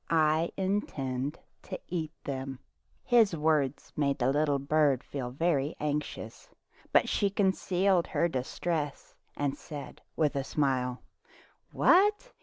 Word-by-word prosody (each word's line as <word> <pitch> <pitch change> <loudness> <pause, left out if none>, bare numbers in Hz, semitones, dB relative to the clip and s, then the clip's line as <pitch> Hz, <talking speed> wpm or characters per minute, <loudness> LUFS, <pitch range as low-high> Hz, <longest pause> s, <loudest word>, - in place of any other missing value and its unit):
I 160 0 +3
intend 145 -8 -2 0.2
to - - -7
eat 160 -3 -3
them." 135 -1 -4 0.5
His 230 -7 +4
words 150 -3 0
made 140 -2 +1
the 130 -1 +2
little 145 0 +2
bird 140 -1 +2
feel 130 -4 -5
very 145 +1 0
anxious, 145 -6 -4 0.4
but - - +4
she 200 - +1
concealed 190 -2 +2
her 170 - +1
distress 145 +1 -3 0.2
and 140 -1 0
said 150 -1 -9
with 150 -2 +1
a 140 - 0
smile: 130 -3 0 0.3
" - - -30
What 415 +7 +4
150 Hz, 125 wpm, -30 LUFS, 135-175 Hz, 0.5 s, His